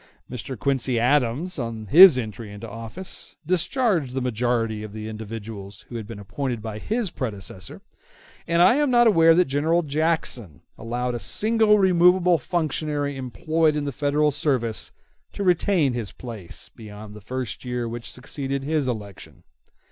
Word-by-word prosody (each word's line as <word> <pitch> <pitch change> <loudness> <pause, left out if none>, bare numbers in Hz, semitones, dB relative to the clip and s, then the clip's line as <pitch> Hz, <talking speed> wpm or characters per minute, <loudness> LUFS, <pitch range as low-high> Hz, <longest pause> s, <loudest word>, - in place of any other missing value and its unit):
Mr. 125 +1 -6
Quincy 130 +1 0
Adams, 140 +7 +1
on 115 -3 -4
his 165 - +9
entry 110 -2 -5
into 105 +3 -8
office, 115 - -7
discharged 180 - 0
the - - +1
majority 115 -2 -1
of 105 -1 -8
the 110 0 -6
individuals 110 -2 -8
who 120 - -8
had 110 -3 -5
been 115 - -8
appointed 115 +5 -4
by 110 -1 -6
his 220 - -2
predecessor: 95 - -6 0.6
and 170 +1 +4
I 215 +9 +5
am 295 -1 +2
not 240 -1 +5
aware 165 -7 +6
that 180 +1 +4
General 160 +5 +1
Jackson 145 - -1
allowed 120 +2 -3
a 120 - -3
single 215 - +3
removable 180 -2 +4
functionary 150 -2 -2
employed 150 +6 0
in 150 -1 -2
the 140 - -2
Federal 150 +2 +1
service 125 -6 -1 0.4
to 200 - -4
retain 180 -5 +2
his 115 -4 -4
place 110 -8 -8
beyond 105 -1 -10
the 105 - -11
first 125 0 -5
year 125 -1 -3
which 115 0 -6
succeeded 135 +1 -4
his 150 -1 0
election. 105 -5 -7
130 Hz, 155 wpm, -24 LUFS, 115-165 Hz, 0.6 s, his